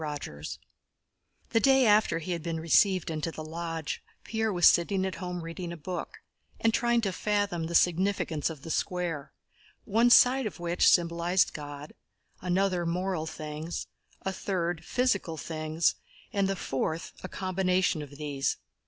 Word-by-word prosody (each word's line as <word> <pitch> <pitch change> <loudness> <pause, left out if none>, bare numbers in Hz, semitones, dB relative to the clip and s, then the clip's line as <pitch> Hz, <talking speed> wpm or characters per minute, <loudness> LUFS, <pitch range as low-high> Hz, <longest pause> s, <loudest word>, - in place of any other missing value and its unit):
CHAPTER 145 - -5
V - - -5 1.0
The 225 - +3
day 265 +2 +5
after 210 -5 +4
he 165 +2 -5
had 170 -2 -2
been 165 0 -3
received 180 +2 +3
into 160 +1 -2
the 155 - -7
Lodge, 165 0 -4 0.2
Pierre 220 -1 -1
was 175 -3 +5
sitting 190 +2 +3
at 190 - -2
home 180 -1 -4
reading 170 +1 -6
a 170 - -6
book 175 +3 -6 0.4
and 225 0 +2
trying 235 0 +2
to 200 -4 0
fathom 205 -5 0
the 170 - -3
significance 175 -4 +2
of 155 -4 -9
the 165 - -5
Square, 175 -7 -2 0.5
one 230 +4 +4
side 250 +1 +6
of 205 - -8
which 175 0 +2
symbolized 170 +1 +2
God, 145 0 -8 0.5
another 185 0 +1
moral 175 -1 -1
things, 155 +1 -5 0.4
a 190 - -2
third 175 -3 -2
physical 200 -8 0
things, 155 +1 0 0.4
and 200 -2 +2
the 195 - 0
fourth 160 0 -3
a 185 - -5
combination 185 -3 0
of 145 -1 -10
these. 145 -2 -1
175 Hz, 155 wpm, -29 LUFS, 160-195 Hz, 1.0 s, side